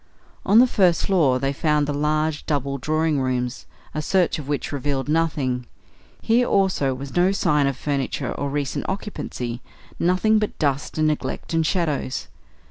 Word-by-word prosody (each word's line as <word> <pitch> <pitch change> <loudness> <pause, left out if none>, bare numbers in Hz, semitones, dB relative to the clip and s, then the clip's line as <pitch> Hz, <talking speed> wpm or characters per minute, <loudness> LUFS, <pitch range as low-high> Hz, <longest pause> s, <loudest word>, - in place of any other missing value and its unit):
On 205 - +5
the 245 - +9
first 185 -8 +2
floor 155 -10 +3
they 135 +2 -1
found 150 0 +1
the 145 - -2
large 150 +1 0
double 140 -2 -1
drawing 155 +1 +1
rooms, 125 -1 -2 0.3
a 155 - -2
search 180 +1 +1
of 140 - -8
which 145 -1 -2
revealed 140 -1 -2
nothing. 145 -6 0 0.6
Here 240 +2 +3
also 185 -9 +2
was 135 +1 -8
no 180 +2 +4
sign 150 -7 +2
of 135 -2 -2
furniture 140 -2 -2
or 140 - -3
recent 140 -1 -2
occupancy; 130 - -4 0.4
nothing 185 +5 +3
but 210 - -3
dust 140 -1 -1
and 155 - +2
neglect 155 +2 -3
and 165 0 +2
shadows. 155 -6 -1
150 Hz, 160 wpm, -23 LUFS, 135-175 Hz, 0.6 s, the